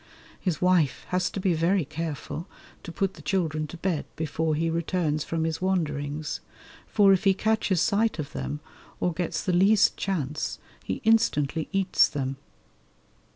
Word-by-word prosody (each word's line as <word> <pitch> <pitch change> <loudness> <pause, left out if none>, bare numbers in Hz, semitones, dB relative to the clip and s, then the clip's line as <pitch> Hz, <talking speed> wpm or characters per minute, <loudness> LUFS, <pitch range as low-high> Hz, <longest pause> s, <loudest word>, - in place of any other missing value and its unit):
His 180 -6 -1
wife 180 -6 +2
has 180 0 +1
to - - -5
be 185 -2 +2
very 170 +2 +2
careful 155 +1 -5 0.3
to 170 - -8
put 195 +2 -1
the 155 - -13
children 155 -1 -1
to 175 - -9
bed 170 -3 -1
before 160 0 -1
he 165 +2 0
returns 165 -2 0
from 165 -1 -2
his 160 +1 -2
wanderings, 150 -5 -1 0.5
for 200 -2 +5
if 190 - +1
he 195 -2 +4
catches 215 -4 +1
sight 220 +3 +2
of 150 -3 -5
them 150 +1 -4 0.4
or 175 - 0
gets 175 +1 -2
the 185 - 0
least 200 +4 +5
chance 155 -6 -2 0.3
he - - -3
instantly 160 -9 +2
eats 195 -1 +3
them. 135 -2 -3
170 Hz, 155 wpm, -26 LUFS, 155-190 Hz, 0.5 s, for